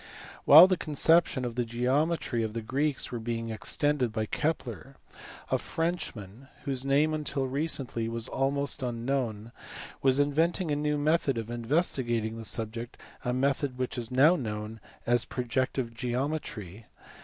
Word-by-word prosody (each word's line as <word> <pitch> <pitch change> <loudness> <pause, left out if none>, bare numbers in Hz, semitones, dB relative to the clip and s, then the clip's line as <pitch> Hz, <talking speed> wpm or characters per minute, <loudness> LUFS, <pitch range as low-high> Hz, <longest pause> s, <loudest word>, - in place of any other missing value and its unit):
While 160 +5 +11
the 185 -1 +1
conceptions 155 -3 +3
of 120 - -3
the 125 +1 -1
geometry 125 +3 0
of 110 -1 -3
the 115 -1 -4
Greeks 140 +5 -1
were 120 - -3
being 115 0 -3
extended 130 +3 0
by 110 0 -2
Kepler, 125 - -3 0.6
a - - +2
Frenchman, 135 - -4 0.2
whose 135 -2 -2
name 145 +3 +2
until 145 -3 -1
recently 130 -5 -1
was 115 0 -1
almost 140 +2 -1
unknown, 120 -2 -2 0.5
was 135 -1 +3
inventing 160 +4 +1
a - - +2
new 150 0 0
method 145 -3 +1
of 115 0 -4
investigating 120 -3 0
the 115 - -7
subject 115 +2 -3 0.3
a 125 - -1
method 135 0 0
which 130 -1 -3
is 120 -3 -4
now 140 +7 +5
known 110 -4 -5 0.3
as 120 0 +3
projective 125 -1 -2
geometry. 120 - -4
130 Hz, 145 wpm, -28 LUFS, 115-145 Hz, 0.6 s, While